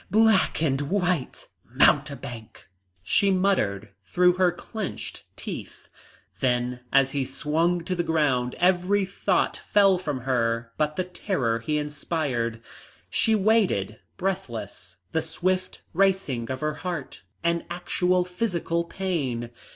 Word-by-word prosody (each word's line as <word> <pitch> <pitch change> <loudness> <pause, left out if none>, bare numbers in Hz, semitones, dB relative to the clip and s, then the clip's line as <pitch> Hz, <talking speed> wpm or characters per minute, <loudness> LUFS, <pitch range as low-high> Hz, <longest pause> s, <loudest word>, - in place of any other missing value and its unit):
Black 220 -6 +4
and 135 -3 +1
white! 180 -7 -1 0.2
Mountebank!" 115 -5 +1 0.4
she 150 - +3
muttered 180 - +1
through 180 - +3
her 180 0 +3
clenched 205 +3 -6
teeth. - - -8 0.5
Then 125 -1 0
as 135 0 +4
he 140 -2 0
swung 160 +6 0
to 185 - -2
the 175 - 0
ground 145 -7 +1
every 185 +2 +3
thought 195 - 0
fell 195 -3 +3
from 150 -7 -3
her 115 -2 0
but 150 0 0
the 185 - 0
terror 160 - -1
he 150 +7 -1
inspired. 140 -6 -2 0.5
She 225 - +3
waited, 190 - +2 0.2
breathless, 120 - -4
the 160 - +1
swift 185 +3 -2
racing 185 -11 +1
of 130 0 -4
her 155 0 0
heart 170 - -5 0.2
an 170 0 +1
actual 180 +1 +1
physical 180 -3 -1
pain. 150 -10 -3
165 Hz, 120 wpm, -26 LUFS, 125-185 Hz, 0.5 s, Black